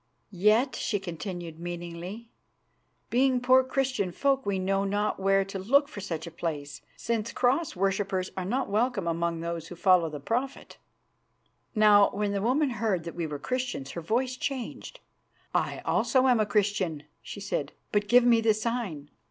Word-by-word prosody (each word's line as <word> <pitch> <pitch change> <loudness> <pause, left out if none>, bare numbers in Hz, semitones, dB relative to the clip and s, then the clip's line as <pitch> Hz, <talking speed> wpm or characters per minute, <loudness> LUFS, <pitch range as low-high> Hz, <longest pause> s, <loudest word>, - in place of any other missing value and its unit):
"Yet," 215 +8 +3
she 205 - -1
continued 175 -2 -6
meaningly, 175 +5 -6 0.8
"being 255 +1 +3
poor 255 +1 +5
Christian 260 -7 -1
folk 270 +4 0
we 200 -1 +1
know 195 +1 0
not 205 +1 -1
where 195 0 +3
to 195 0 -6
look 280 +9 +3
for 280 -8 -9
such 165 -5 -4
a 170 - -8
place, 145 -4 -5 0.2
since 230 -1 -2
Cross 270 +6 +1
worshippers 195 0 -1
are 185 - -3
not 245 +9 -1
welcome 215 -2 0
among 170 0 -1
those 170 -1 -4
who 175 - -9
follow 180 -2 +4
the 150 -1 -6
Prophet." 245 - -3 1.0
Now, 210 -1 +6
when 205 0 -1
the 200 -1 -1
woman 260 +5 +2
heard 210 -7 -1
that 170 - -6
we 170 -2 -3
were 150 -1 -5
Christians 245 - -3
her 170 - -5
voice 245 +9 0
changed. 270 - -5 0.5
"I - - -1
also 260 -1 +2
am 245 -3 +4
a 215 - +2
Christian," 200 -7 0 0.2
she - - -8
said; 155 -7 -3 0.2
"but 205 0 +1
give 245 +3 +6
me 235 -2 +5
the 220 -1 +3
sign." 215 -10 -3
200 Hz, 170 wpm, -28 LUFS, 175-245 Hz, 1.0 s, Now